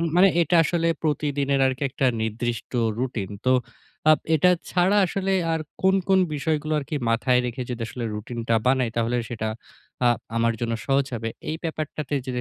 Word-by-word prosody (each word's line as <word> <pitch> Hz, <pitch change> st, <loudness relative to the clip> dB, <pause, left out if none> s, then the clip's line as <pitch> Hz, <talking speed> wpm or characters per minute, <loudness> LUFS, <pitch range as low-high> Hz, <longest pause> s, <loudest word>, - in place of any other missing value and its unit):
মানে 190 Hz, +2 st, +7 dB
এটা 170 Hz, +1 st, +2 dB
আসলে 165 Hz, +1 st, 0 dB, 0.2 s
প্রতিদিনের 145 Hz, -2 st, 0 dB
আরকি 130 Hz, +1 st, -2 dB
একটা 135 Hz, +1 st, -1 dB, 0.2 s
নির্দিষ্ট 115 Hz, +2 st, -3 dB, 0.3 s
রুটিন। 120 Hz, -7 st, -2 dB, 0.2 s
তো, 130 Hz, -, +5 dB, 0.6 s
আব 155 Hz, -, +6 dB, 0.2 s
এটা 170 Hz, +4 st, +4 dB, 0.2 s
ছাড়া 185 Hz, +3 st, +3 dB
আসলে, 195 Hz, +2 st, -1 dB, 0.2 s
আর 160 Hz, -, 0 dB, 0.2 s
কোন, 190 Hz, 0 st, +4 dB
কোন 190 Hz, 0 st, +5 dB, 0.2 s
বিষয়গুলো 155 Hz, +1 st, -1 dB
আরকি 145 Hz, +1 st, -5 dB
মাথায় 125 Hz, +2 st, +3 dB
রেখে 125 Hz, +1 st, -4 dB
যদি 120 Hz, -1 st, -4 dB
আসলে 120 Hz, +1 st, -6 dB
রুটিনটা 115 Hz, +2 st, -2 dB
বানাই, 130 Hz, -2 st, +3 dB
তাহলে 115 Hz, +1 st, +1 dB
সেটা 110 Hz, -2 st, -3 dB, 0.6 s
আ -, -, +6 dB, 0.3 s
আমার 115 Hz, 0 st, +2 dB
জন্য 115 Hz, -1 st, -1 dB
সহজ 135 Hz, +1 st, +2 dB
হবে। 115 Hz, 0 st, -3 dB, 0.2 s
এই 155 Hz, -, -1 dB
ব্যাপারটাতে 155 Hz, -3 st, -4 dB
যদি 125 Hz, -1 st, -2 dB
135 Hz, 165 wpm, -24 LUFS, 120-155 Hz, 0.6 s, মানে